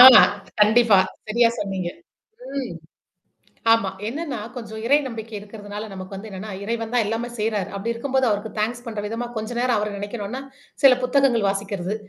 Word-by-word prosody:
அ - - +14 0.6
கண்டிப்பா. 215 -1 +6 0.3
சரியா 230 +2 +4
சொன்னீங்க. 190 -3 -2 0.7
ம், 260 -9 -3 1.0
ஆமா, 225 -4 +3 0.2
என்னன்னா 290 -1 -4 0.2
கொஞ்சம் 220 -2 -6
இறை 285 +4 +6
நம்பிக்கை 225 -2 -7
இருக்கிறதுனால 205 0 -7
நமக்கு 190 0 -7
வந்து 215 +3 -8
என்னன்னா, 195 +3 -6
இறைவன் 230 +1 -3
தான் 235 - +4
எல்லாமே 225 +3 -2
செய்றாரு. 210 -2 0
அப்பிடி 230 +4 -1
இருக்கும்போது 265 +1 +1
அவருக்கு 205 +1 -2
தாங்க்ஸ் 240 +3 -1
பண்ற 220 -2 -3
விதமா 230 +3 -3
கொஞ்ச 220 +1 -3
நேரம் 245 -3 +2
அவர 210 0 -1
நினைக்கணுனா, 205 +4 -4 0.4
சில 270 -2 +9
புத்தகங்கள் 250 -4 +3
வாசிக்கிறது. 195 -1 -3
220 Hz, 155 wpm, -23 LUFS, 205-240 Hz, 1.0 s, அ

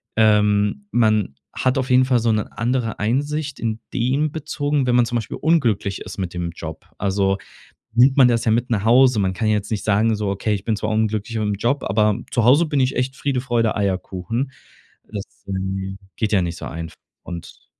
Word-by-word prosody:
ähm, 105 - +3
man 110 - +2 0.2
hat 130 +1 0
auf 130 0 -1
jeden 130 0 +5
Fall 125 -2 +3
so 115 0 +1
'ne 110 -1 -2
andere 115 +1 -1
Einsicht 145 +6 -1
in 115 -1 -2
dem 135 +5 +1
bezogen, 145 -3 -1
wenn 120 - +3
man 120 -1 +5
zum 120 +1 -1
Beispiel 110 - -4
unglücklich 120 - +1
ist - - -8
mit 95 -3 -3
dem 85 -1 -3
Job, 80 -2 -8
also 95 0 +1 0.6
nimmt 130 +3 +5
man 130 -3 +8
das 115 -1 +1
ja 110 - +3
mit 120 +3 +1
nach 110 -3 0
Hause. 125 0 +5
Man 95 -2 +1
kann 110 +4 -1
ja 105 - +3
jetzt 105 +1 -3
nicht 105 -2 -2
sagen: 110 +2 +2
„So 105 -1 -2
okay, 100 +2 -1
ich 100 -2 -3
bin 110 0 0
zwar 110 - -2
unglücklich 110 +1 -1
mit 105 -1 0
'm 105 - 0
Job, 125 +6 0
aber 105 +2 +2
zu 120 -3 +1
Hause 140 +8 +6
bin 145 -2 0
ich 130 0 +1
echt 130 +2 -1
Friede, 135 -3 -1
Freude, 120 -4 +1
Eierkuchen.“ 100 +5 -2 0.6
Das, 100 -2 -4 0.2
ähm, 95 0 -3 0.2
geht 110 -1 -1
ja 100 - +4
nicht 85 -1 -3
so - - -8
einfach 80 +3 -6 0.3
und 85 -1 -9
110 Hz, 210 wpm, -21 LUFS, 100-130 Hz, 0.6 s, man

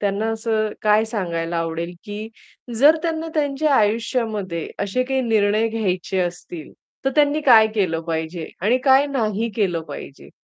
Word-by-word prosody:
त्यांना 205 +2 -1
असं 220 -1 -1
काय 215 +1 +4
सांगायला 170 -6 -3
आवडेल, 165 +1 -3
की 210 +1 -6 0.5
जर 300 +5 +6
त्यांना 325 -1 -2
त्यांच्या 290 -1 +1
आयुष्यामध्ये 215 -5 0 0.2
असे 200 +5 0
काही 265 +1 0
निर्णय 220 -1 +2
घ्यायचे 190 -4 -2
असतील, 175 -2 -5 0.3
तर 270 - +2
त्यांनी 295 0 +3
काय 235 -7 +7
केलं 180 -6 0
पाहिजे 160 0 -4
आणि 230 +7 +2
काय 270 +1 +5
नाही 230 -4 -1
केलं 185 -6 0
पाहिजे? 140 -1 -10
215 Hz, 145 wpm, -21 LUFS, 180-255 Hz, 0.5 s, काय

